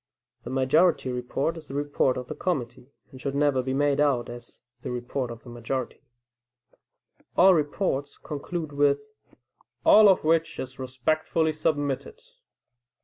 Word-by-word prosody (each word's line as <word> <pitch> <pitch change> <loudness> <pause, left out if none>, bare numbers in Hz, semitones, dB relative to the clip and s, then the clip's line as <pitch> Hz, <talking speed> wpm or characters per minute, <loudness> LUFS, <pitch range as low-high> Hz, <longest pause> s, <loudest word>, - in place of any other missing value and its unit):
The - - -5
majority 135 +2 +2
report 125 +6 -2
is 155 - -11
the 135 - -7
report 145 -2 +1
of 125 - -5
the - - -6
committee, 130 -7 -3 0.2
and 130 - -12
should 140 -1 -3
never 140 -2 +2
be 130 +1 -2
made 145 0 +2
out 140 -5 +2
as 120 0 -10 0.2
the - - -5
report 125 +1 -3
of 115 -1 -9
the 125 - -12
majority. 120 +2 -4 1.4
All 190 +1 +7
reports 145 -2 -1
conclude 155 +2 -5
with, 145 0 +3 0.9
"All 215 -1 +8
of 190 - +3
which 165 +1 +1
is 130 +1 -7
respectfully 155 +5 0
submitted." 150 - -2
140 Hz, 145 wpm, -26 LUFS, 130-155 Hz, 1.4 s, All